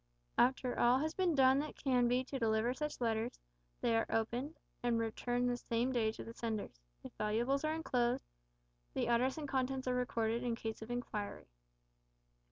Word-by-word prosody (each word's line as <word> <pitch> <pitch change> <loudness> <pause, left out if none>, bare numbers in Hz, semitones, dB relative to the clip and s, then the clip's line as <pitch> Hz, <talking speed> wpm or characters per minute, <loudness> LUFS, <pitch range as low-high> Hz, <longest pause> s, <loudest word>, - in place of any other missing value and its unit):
After 255 0 +3
all 240 +2 +5
has 310 +3 -1
been 365 -4 +1
done 265 0 +6
that 300 - -4
can 250 -3 +2
be 250 +2 +2
to 270 +1 -5
deliver 225 +1 +2
such 300 +3 -4
letters, 230 0 0 0.4
they 230 -1 +2
are 225 - +2
opened, 240 +7 -1 0.2
and 240 -1 +2
returned 245 +2 0
the 245 0 +1
same 235 +2 0
day 225 -4 +2
to - - -7
the 230 - -8
senders. 220 - -4 0.2
If - - -9
valuables 235 +7 +1
are 310 +1 +1
enclosed, 250 -6 0 0.7
the - - +1
address 250 +4 +2
and 300 -2 -4
contents 265 -1 -1
are 250 - +2
recorded 235 -2 0
in 240 -2 0
case 225 -2 -5
of 220 - -8
inquiry. 230 -4 -4
245 Hz, 175 wpm, -36 LUFS, 230-260 Hz, 0.7 s, done